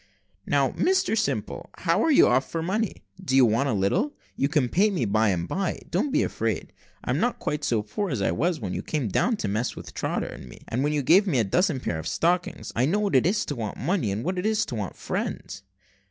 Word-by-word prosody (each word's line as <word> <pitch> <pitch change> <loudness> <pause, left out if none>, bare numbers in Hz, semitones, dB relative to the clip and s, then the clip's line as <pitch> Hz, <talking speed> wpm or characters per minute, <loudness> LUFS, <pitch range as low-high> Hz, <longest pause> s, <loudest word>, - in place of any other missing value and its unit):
"Now, - - +2
Mr 375 -7 +1
Simple, 220 - -2
how - - +1
are - - +2
you 290 - +6
off 130 +2 +2
for 165 -1 -3
money? 210 +4 -2 0.2
Do 135 -7 0
you 135 -2 +7
want 115 +5 +2
a - - +1
little? 170 - 0 0.2
You 140 - +1
can 145 -5 +2
pay 195 - +3
me 180 - -1
by 110 +1 +2
and 90 -2 -1
bye. 190 -2 -1
Don't 190 +12 +1
be - - +3
afraid: - - -2 0.3
I - - -2
am - - +1
not 245 - +1
quite 150 0 -3
so 115 -6 +1
poor 190 - -3
as 130 - -2
I 95 - +1
was 165 - 0
when 95 -5 -4
you - - -2
came 145 -8 -2
down 230 - +1
to 110 - -3
mess 110 +5 -1
with - - -9
Trotter - - -2
and 65 - -9
me, - - -13
and 125 +4 -1
when 150 - +1
you 150 -2 0
gave 190 +9 +5
me 165 - +1
a 115 - +3
dozen 160 - +1
pairs 85 -9 -3
of 80 - -5
stockings. 175 - 0
I 125 +3 +2
know 185 +7 +2
what 205 -7 0
it 130 - +5
is 205 +3 +1
to 145 - -4
want 110 -4 -4
money, 170 - 0
and 105 +4 -3
what 185 +3 -1
it 180 - -3
is 220 +1 +1
to 120 - -5
want 100 -5 -4
friends." 95 - -4
145 Hz, 255 wpm, -26 LUFS, -, 0.3 s, you